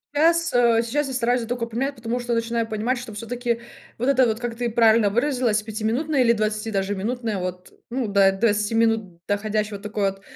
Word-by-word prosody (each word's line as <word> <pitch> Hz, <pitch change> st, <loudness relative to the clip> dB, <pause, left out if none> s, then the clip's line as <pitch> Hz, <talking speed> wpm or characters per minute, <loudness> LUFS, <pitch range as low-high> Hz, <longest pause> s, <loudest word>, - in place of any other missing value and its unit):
Сейчас, 335 Hz, +2 st, +3 dB
э, 235 Hz, -2 st, +4 dB
щас, 280 Hz, +5 st, -1 dB
я 265 Hz, -, -5 dB
стараюсь 245 Hz, 0 st, +1 dB
только 240 Hz, 0 st, -2 dB
поменять, 255 Hz, +5 st, -2 dB
потому 230 Hz, +1 st, -3 dB
что 240 Hz, -1 st, -1 dB
начинаю 230 Hz, 0 st, -1 dB
понимать, 230 Hz, +4 st, -1 dB
что 225 Hz, -3 st, -9 dB
всё-таки 235 Hz, +1 st, -3 dB, 0.4 s
вот 245 Hz, -, -2 dB
это 260 Hz, -2 st, +4 dB
вот, 220 Hz, 0 st, -1 dB
как 240 Hz, -1 st, -4 dB
ты 240 Hz, 0 st, -2 dB
правильно 225 Hz, -2 st, +4 dB
выразилась, 240 Hz, -2 st, +1 dB
пятиминутное, 230 Hz, +7 st, -1 dB
или 235 Hz, -2 st, +5 dB
20 215 Hz, 0 st, -1 dB
даже 195 Hz, -1 st, -1 dB
минутное, 225 Hz, +1 st, -2 dB
вот 180 Hz, 0 st, -6 dB, 0.2 s
ну 245 Hz, -1 st, -2 dB
до 200 Hz, -1 st, +4 dB
20 210 Hz, +2 st, +1 dB
минут 220 Hz, -7 st, 0 dB
доходящего 210 Hz, 0 st, -1 dB
такой 205 Hz, -1 st, -1 dB
вот, 195 Hz, 0 st, -15 dB
230 Hz, 190 wpm, -23 LUFS, 210-245 Hz, 0.4 s, или